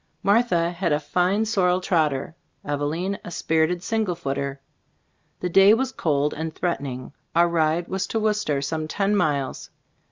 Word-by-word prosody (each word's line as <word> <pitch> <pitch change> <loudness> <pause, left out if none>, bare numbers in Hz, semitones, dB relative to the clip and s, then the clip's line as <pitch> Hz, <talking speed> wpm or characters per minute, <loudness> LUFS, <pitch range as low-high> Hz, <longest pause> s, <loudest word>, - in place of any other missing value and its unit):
Martha 200 -5 +3
had 175 -1 -1
a 150 - +2
fine 185 +7 +1
sorrel 180 -4 +2
trotter, 160 -5 0 0.3
Eveline 150 +7 -2
a - - -7
spirited 165 +1 0
single 215 -5 -1
footer. 140 -3 -3 0.8
The 180 - -1
day 195 +4 +7
was 260 +2 -1
cold 150 - 0
and 160 +1 -4
threat 175 -4 -1
ening. 130 -1 -6 0.2
Our 170 +1 +5
ride 165 0 +1
was 190 0 -2
to 225 - -1
Worcester, 210 -10 0
some 155 +2 -2
ten 200 +5 0
miles. 145 -8 -1
170 Hz, 155 wpm, -24 LUFS, 150-195 Hz, 0.8 s, day